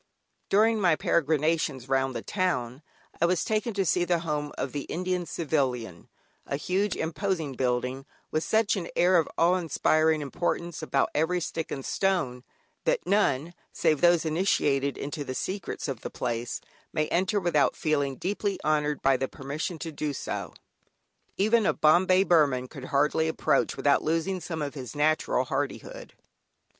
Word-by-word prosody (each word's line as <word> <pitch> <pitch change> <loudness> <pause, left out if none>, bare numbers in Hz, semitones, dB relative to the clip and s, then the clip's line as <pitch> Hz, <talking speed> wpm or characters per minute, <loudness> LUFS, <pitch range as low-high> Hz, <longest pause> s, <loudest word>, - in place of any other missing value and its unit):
During 220 +2 +3
my 175 -4 +4
peregrinations 155 -4 +1
round 135 -1 +1
the - - -4
town 140 - -1 0.4
I 170 - +5
was 180 -1 +1
taken 215 0 -1
to 195 -1 +1
see 180 +1 +2
the 175 -1 +1
home 150 -3 -2
of 130 - -2
the 145 -1 -4
Indian 180 0 -2
Civilian, 130 - -2 0.4
a - - -1
huge 185 +6 0
imposing 165 -2 -2
building, 125 +2 -1 0.2
with 155 +1 0
such 220 -1 +2
an 185 -4 -3
air 180 +2 +4
of 160 - -1
awe 175 +2 +4
inspiring 160 -2 +2
importance 170 +3 -2
about 135 - 0
every 170 +4 +1
stick 165 -1 -4
and 135 - -4
stone, 160 -11 0 0.4
that - - 0
none 170 -6 +1 0.2
save 155 -4 +1
those 175 -1 +4
initiated 145 -5 +1
into 145 +1 -4
the 130 -2 -5
secrets 190 +1 -4
of 130 -6 -4
the - - -5
place, 120 -1 -3 0.3
may 155 -1 0
enter 190 +4 +1
without 170 -6 +2
feeling 145 -3 0
deeply 200 +4 -2
honoured 150 -1 +1
by 135 -1 +4
the 135 - -1
permission 145 +7 -5
to 165 +1 -5
do 150 -1 -3
so. - - -5 0.8
Even 220 +3 +3
a - - +2
"Bombay 185 +4 +4
Burman" 145 -8 +3
could 135 -1 -9
hardly 150 +4 +2
approach, 155 -2 +1
without 140 -1 +3
losing 165 +4 0
some 160 -2 -4
of 140 - -4
his 130 -2 -8
natural 155 +2 +1
hardihood. - - -4
160 Hz, 160 wpm, -27 LUFS, 140-180 Hz, 0.8 s, I